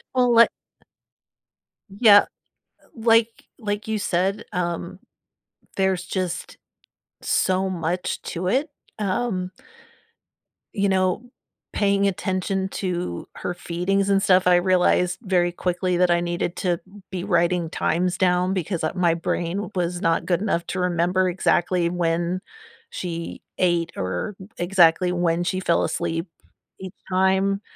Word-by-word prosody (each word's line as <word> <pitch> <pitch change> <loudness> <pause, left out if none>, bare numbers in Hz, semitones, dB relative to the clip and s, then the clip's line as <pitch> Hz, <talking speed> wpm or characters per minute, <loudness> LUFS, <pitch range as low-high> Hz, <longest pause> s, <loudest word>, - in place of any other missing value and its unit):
Well, 250 -1 +3
li 230 0 +8 1.4
Yeah, 205 0 +7 0.6
uh, - - -26
like 230 0 +2
like 205 -2 -3
you 220 -1 0
said, 195 +1 0
um, 175 0 -3 0.8
there's 190 -2 +1
just 185 -1 -4 0.6
so 190 +1 +1
much 175 0 -2
to 180 +1 -4
it, 270 +10 +1 0.3
um 195 -2 -1 1.2
you 200 -2 +1
know, 185 +3 +1 0.5
paying 200 -1 +2
attention 190 0 -1
to 175 - -4
her - - -4
feedings 180 +3 -1
and 195 0 +3
stuff, 185 -2 +4
I 180 - +6
realized 180 0 +2
very 180 -5 +1
quickly 180 0 -1
that 180 0 +3
I 170 - +3
needed 175 0 -2
to 175 -3 0 0.3
be 185 -2 -4
writing 175 -2 +1
times 175 +3 0
down 180 0 +2
because, 180 -2 -2
uh, 155 - 0
my 175 -3 +3
brain 170 +4 -2
was 175 -1 -1
not 165 -3 +1
good 175 -2 +1
enough 185 -5 -1
to 190 - -3
remember 180 +1 +1
exactly 175 -1 +1
when 170 +1 -1 0.5
she 170 - -5 0.2
ate 175 -2 +1
or 95 - -3 0.2
exactly 180 0 +4
when 175 -1 0
she 185 +1 -1
fell 170 -2 +1
asleep 165 +3 -2 0.5
each 190 -1 -8 0.2
time, 190 +1 +2
180 Hz, 130 wpm, -23 LUFS, 175-195 Hz, 1.4 s, li